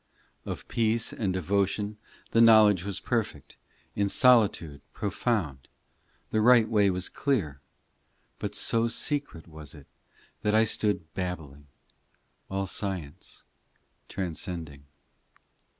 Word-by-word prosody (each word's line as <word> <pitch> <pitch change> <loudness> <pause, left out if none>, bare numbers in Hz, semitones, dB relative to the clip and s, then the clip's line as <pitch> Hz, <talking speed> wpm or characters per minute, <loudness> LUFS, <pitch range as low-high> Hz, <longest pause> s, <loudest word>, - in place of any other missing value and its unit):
ii - - -2
Of - - -8
peace 115 0 0
and 100 -5 -2
devotion 100 +3 -1 0.3
The 115 - +4
knowledge 110 -5 +6
was 100 -1 -4
perfect, 110 - -3 0.4
In 100 -1 0
solitude 100 - +3
profound; 100 - -2 0.6
The 110 - +1
right 120 -1 +6
way 105 -3 +3
was 90 0 -2
clear, 90 - -2 0.8
But 105 0 -4
so 115 +3 +1
secret 140 - -2
was 80 -2 -11
it, 70 -2 -14 0.6
That 105 0 +1
I 110 - +6
stood 100 -7 -1
babbling, 80 -6 -6 0.8
All 95 0 -2
science 90 -6 -5 0.7
transcending. 85 -5 -5
100 Hz, 110 wpm, -27 LUFS, 80-110 Hz, 0.8 s, knowledge